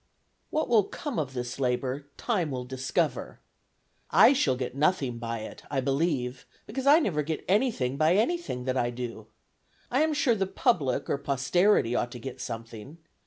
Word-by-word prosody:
"What 310 - 0
will 225 -5 +4
come 290 - -4
of 135 -4 -3
this 125 +1 -4
labor, 130 +2 -1
time 190 -10 0
will 125 -2 -4
discover. 130 +1 -2 0.7
I - - +7
shall 150 - +2
get 125 -1 -4
nothing 140 -5 +1
by 115 -1 -4
it, 110 - -9
I 140 - 0
believe, 135 -2 -1 0.2
because 265 +5 -4
I 290 +2 +8
never 185 - +1
get 155 +2 -4
anything 190 - +1
by 155 +4 +4
anything 235 - 0
that 130 0 0
I 120 -1 +1
do. 120 -3 -6 0.6
I 260 +4 +3
am 310 -1 +2
sure 270 -4 +3
the 195 -3 -1
public 165 - +1
or 140 - -1
posterity 140 - +2
ought 120 0 -1
to 120 - -7
get 130 +2 -7
something. 115 +5 -7
140 Hz, 170 wpm, -28 LUFS, 125-200 Hz, 0.7 s, I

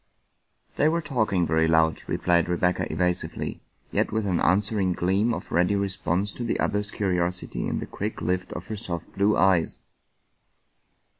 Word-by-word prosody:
" - - -42
They 150 - +4
were 170 +1 +1
talking 110 - +1
very 80 +1 +2
loud," 80 -1 +3
replied 85 -1 +1
Rebecca 90 +1 +1
evasivelv, 90 +2 -2 0.3
yet - - 0
with 110 -1 -1
an 90 -3 +1
answering 95 0 +3
gleam 95 +7 +1
of - - -5
ready 90 +4 +2
response 95 0 -1
to 120 - -6
the 115 - -1
other's 105 0 0
curiosity 90 -3 -2
in - - -1
the - - -4
quick 105 +2 -5
lift 90 0 -2
of - - -6
her 110 - -5
soft 85 -5 -5
blue 100 +2 +2
eyes. 95 -4 +3
95 Hz, 160 wpm, -25 LUFS, 90-105 Hz, 0.3 s, They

